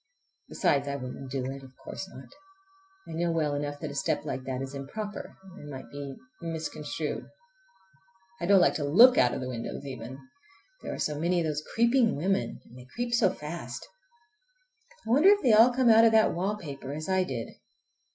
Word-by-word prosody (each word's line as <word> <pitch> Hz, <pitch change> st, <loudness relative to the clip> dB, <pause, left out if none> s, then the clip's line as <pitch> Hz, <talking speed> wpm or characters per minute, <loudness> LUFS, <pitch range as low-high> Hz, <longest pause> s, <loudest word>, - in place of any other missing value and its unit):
Besides 140 Hz, 0 st, +1 dB
I 140 Hz, -, -2 dB
wouldn't 130 Hz, 0 st, -7 dB
do 130 Hz, -1 st, -2 dB
it. 135 Hz, +1 st, -5 dB
Of 130 Hz, -1 st, -15 dB
course 190 Hz, -, -7 dB
not. 135 Hz, -8 st, -11 dB, 0.8 s
I -, -, -9 dB
know 170 Hz, +1 st, 0 dB
well 155 Hz, -3 st, 0 dB
enough 145 Hz, 0 st, -3 dB
that 155 Hz, -3 st, -4 dB
a -, -, -8 dB
step 140 Hz, -, -1 dB
like 130 Hz, 0 st, -4 dB
that 130 Hz, -1 st, -3 dB
is 135 Hz, +1 st, -5 dB
improper 205 Hz, +10 st, -6 dB, 0.2 s
and 145 Hz, -5 st, -10 dB
might 130 Hz, -2 st, -9 dB
be 140 Hz, -1 st, -6 dB, 0.3 s
misconstrued. 160 Hz, 0 st, -4 dB, 1.1 s
I 170 Hz, -, -2 dB
don't 200 Hz, 0 st, +7 dB
like 175 Hz, -, +4 dB
to 150 Hz, -, -3 dB
look 230 Hz, -, +7 dB
out 125 Hz, -, +4 dB
of -, -, -4 dB
the 130 Hz, -, -4 dB
windows 125 Hz, +2 st, -5 dB
even—there 250 Hz, -, -10 dB
are -, -, -7 dB
so 150 Hz, -1 st, -2 dB
many 175 Hz, +2 st, +1 dB
of 165 Hz, -, 0 dB
those 150 Hz, -1 st, -1 dB
creeping 235 Hz, 0 st, +3 dB
women, 160 Hz, -6 st, -1 dB
and 125 Hz, -, -14 dB
they 125 Hz, -, -13 dB
creep 240 Hz, 0 st, -2 dB
so 225 Hz, -5 st, +4 dB
fast. 150 Hz, -7 st, -7 dB, 1.2 s
I 225 Hz, -, -3 dB
wonder 295 Hz, +10 st, +6 dB
if 405 Hz, -2 st, +4 dB
they 245 Hz, -4 st, +5 dB
all 225 Hz, +4 st, +7 dB
come 250 Hz, -1 st, +3 dB
out 225 Hz, +1 st, +7 dB
of 225 Hz, -, +5 dB
that 220 Hz, -1 st, +5 dB
wallpaper 170 Hz, -8 st, -4 dB
as 155 Hz, +1 st, -5 dB
I 190 Hz, -1 st, +2 dB
did? 125 Hz, -9 st, -4 dB
155 Hz, 190 wpm, -28 LUFS, 135-215 Hz, 1.2 s, don't